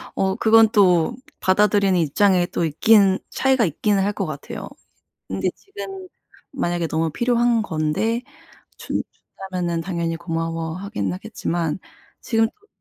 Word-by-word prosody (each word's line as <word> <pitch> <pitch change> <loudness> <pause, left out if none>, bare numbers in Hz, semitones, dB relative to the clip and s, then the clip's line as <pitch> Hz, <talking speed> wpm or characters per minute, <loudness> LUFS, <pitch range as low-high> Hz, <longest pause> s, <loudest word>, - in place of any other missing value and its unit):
어 190 0 +1
그건 225 0 +6
또 190 -1 +4 0.2
받아들이는 195 -1 +3
입장에 180 +4 +3
또 170 - -1
있기는 195 +4 +4
차이가 265 -3 +2
있기는 195 +4 +1
할 205 - 0
것 195 - -2
같아요. 155 -3 -7 0.6
근데 - - -1
지금 390 -2 -9 0.5
만약에 175 -9 -1
너무 160 0 0
필요한 240 +2 +2
건데 195 +8 -1 0.5
준 - - -3 0.5
준다면은 175 -2 -1
당연히 170 -2 -2
고마워하기는 165 +5 -3
하겠지만 180 -5 -3 0.4
지금 225 -1 +2
또 420 - -22
190 Hz, 290 characters per minute, -22 LUFS, 165-225 Hz, 0.6 s, 그건